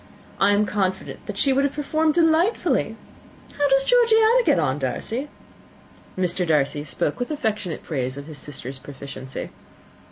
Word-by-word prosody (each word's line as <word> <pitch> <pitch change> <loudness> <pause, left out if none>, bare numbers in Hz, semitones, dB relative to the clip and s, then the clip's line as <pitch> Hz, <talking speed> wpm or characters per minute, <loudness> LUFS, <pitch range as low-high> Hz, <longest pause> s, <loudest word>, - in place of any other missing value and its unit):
I 195 - +4
am 205 +1 +3
confident 190 -2 -2
that 210 - -5
she 270 +6 +3
would 275 +1 +2
have 280 - 0
performed 310 +2 +1
delightfully. 335 +5 +2 0.6
How 290 0 +2
does 270 0 +4
Georgiana 470 0 +5
get - - +3
on, 150 -3 0
Darcy?" 225 - -3 0.9
Mr. 180 0 0
Darcy 145 -1 +1
spoke 150 0 -2
with 245 - -2
affectionate 215 - -2
praise 130 -3 -3
of 140 - -7
his 155 -1 -8
sister's 135 -2 -7
proficiency. 135 -1 -8
205 Hz, 150 wpm, -23 LUFS, -, 0.9 s, Georgiana